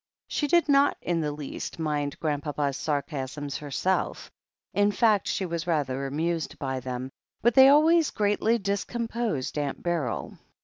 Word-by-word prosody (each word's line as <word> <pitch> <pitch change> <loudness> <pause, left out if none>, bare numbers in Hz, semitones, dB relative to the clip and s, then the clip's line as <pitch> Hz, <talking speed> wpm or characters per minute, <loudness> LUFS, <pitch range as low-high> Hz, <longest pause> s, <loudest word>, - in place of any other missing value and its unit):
9he 295 - 0
did 345 -1 +4
not 280 0 +4
in 170 -2 0
the 150 -1 -1
least 145 -1 -6
mind 150 -3 -2
Grandpapa's 145 -2 -1
sarcasms 145 -1 -3
herself 150 +6 -2 0.2
— - - -57
in 205 0 +4
fact, 210 -1 +3
she 190 - -1
was 170 0 -4
rather 140 -5 0
amused 160 +3 -2
by 130 -3 -3
them 130 +1 -5 0.2
— - - -48
^but 240 - +5
they 265 +2 +8
always 315 +2 +5
greatly 210 +2 +1
discomposed 210 - -2
Aunt 145 -2 -3
Beryl. 170 -4 -2
165 Hz, 150 wpm, -27 LUFS, 145-215 Hz, 0.2 s, they